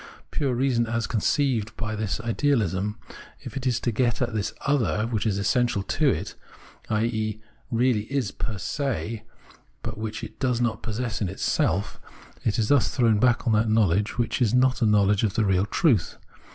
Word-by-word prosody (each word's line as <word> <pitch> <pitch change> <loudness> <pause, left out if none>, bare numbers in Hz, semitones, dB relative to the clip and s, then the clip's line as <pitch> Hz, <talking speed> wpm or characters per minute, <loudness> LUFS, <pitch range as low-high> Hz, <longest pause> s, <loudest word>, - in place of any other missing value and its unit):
Pure 135 -4 0
reason 120 -2 +1
as 115 0 -1
conceived 120 -1 0
by 110 -1 -3
this 105 -2 -2
ideahsm, 110 - 0 0.5
if - - -9
it 135 -1 -2
is 120 -1 +1
to 120 - -1
get 120 +1 +1
at 120 -2 -1
this 105 -2 -1
" - - -27
other 120 -6 +1
" - - -8
which 110 -1 0
is 100 -2 0
essential 120 +1 +1
to 145 +9 +1
it, 95 0 -2 0.6
i.e. 110 -1 -1 0.3
really 115 -1 +1
is 135 -8 0
per 110 -3 -4
se, 115 -1 -3 0.6
but 110 -1 -5
which 110 +1 -4
it - - -9
does 125 -2 +1
not 120 -2 0
possess 115 0 -3
in 100 - 0
itself 95 +1 -1 0.2
— - - -24
is 110 0 +1
thus 140 -4 +4
thrown 115 -5 +3
back 120 0 +3
on 115 - +2
that 110 +1 +2
knowledge 105 -1 +2
which 120 +2 -1
is 120 -1 +3
not 130 +1 +3
a 115 - +4
knowledge 105 -1 +3
of 105 -4 0
the 110 - +2
real 95 0 +2
truth. 110 - +2
115 Hz, 190 wpm, -25 LUFS, 105-125 Hz, 0.6 s, thus